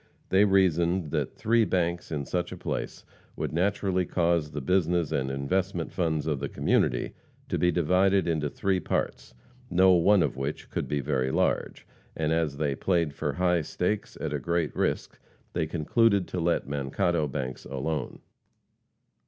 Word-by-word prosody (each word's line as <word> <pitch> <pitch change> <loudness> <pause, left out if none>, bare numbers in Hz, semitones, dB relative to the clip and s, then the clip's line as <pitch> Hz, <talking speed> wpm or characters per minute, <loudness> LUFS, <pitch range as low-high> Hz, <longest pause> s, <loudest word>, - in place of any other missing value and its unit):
They 95 +2 +5
reasoned 90 -4 +2
that - - -2
three 115 +1 +3
banks 85 -4 -1
in 75 -3 -2
such 90 +3 -2
a - - -6
place - - -4 0.3
would - - -3
naturally 95 +1 +1
cause 85 -3 +1
the 75 0 -5
business 85 +1 +1
and 65 0 0
investment 85 +6 -1
funds 80 -4 0
of 75 -3 -1
the 70 - -3
community - - +1 0.4
to - - -1
be 90 - +3
divided 90 +3 +2
into 80 -3 0
three 95 +6 0
parts, 75 - -3 0.3
no 95 +2 +5
one 90 +2 +5
of 75 - -1
which 70 +2 -4
could - - -2
be 75 -1 -1
very 65 -2 0
large, - - 0 0.3
and 80 -1 0
as 80 -4 0
they 75 -2 0
"played 85 0 0
for - - -2
high 90 -1 +2
stakes" 90 +6 -2
at - - -3
a - - -1
great 85 -2 -1
risk, - - -1 0.3
they 80 - 0
concluded 100 +5 +2
to 90 - -3
let 85 -3 0
Mankato 75 +3 0
banks 65 -1 -5
alone. 70 +4 -4
85 Hz, 160 wpm, -27 LUFS, 75-90 Hz, 0.4 s, They